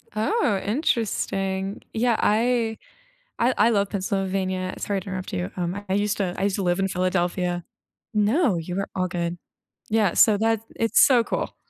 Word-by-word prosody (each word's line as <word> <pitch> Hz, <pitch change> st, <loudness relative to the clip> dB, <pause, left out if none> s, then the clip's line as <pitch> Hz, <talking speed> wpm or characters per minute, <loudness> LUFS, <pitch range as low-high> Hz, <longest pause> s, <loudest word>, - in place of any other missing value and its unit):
Oh, 220 Hz, -, +1 dB
interesting. 195 Hz, -, -1 dB
Yeah. 235 Hz, 0 st, +2 dB
I 225 Hz, 0 st, +2 dB, 0.6 s
I 250 Hz, +2 st, +2 dB
I 220 Hz, +3 st, +4 dB
love 200 Hz, -3 st, +1 dB
Pennsylvania. 190 Hz, -2 st, -2 dB
Sorry 200 Hz, -1 st, -2 dB
to 190 Hz, -, -10 dB
interrupt 185 Hz, -1 st, -5 dB
you. 90 Hz, +1 st, -2 dB
Um, 180 Hz, +3 st, -3 dB
I 190 Hz, -, 0 dB
used 205 Hz, 0 st, +1 dB
to 185 Hz, -3 st, -1 dB
I 190 Hz, -, -2 dB
used 200 Hz, -1 st, +1 dB
to 195 Hz, -, -2 dB
live 175 Hz, +1 st, +1 dB
in 195 Hz, -, +1 dB
Philadelphia. 180 Hz, -1 st, -1 dB, 0.5 s
No, 215 Hz, -, +2 dB
you 170 Hz, +2 st, -4 dB
were 195 Hz, +1 st, -2 dB
all 185 Hz, -1 st, 0 dB
good. 175 Hz, -1 st, -3 dB, 0.5 s
Yeah. 215 Hz, -4 st, +2 dB
So 215 Hz, -3 st, +5 dB
that 225 Hz, 0 st, +1 dB
it's 230 Hz, 0 st, +3 dB
so 245 Hz, -4 st, +5 dB
cool. -, -, -3 dB
195 Hz, 170 wpm, -24 LUFS, 185-220 Hz, 0.6 s, So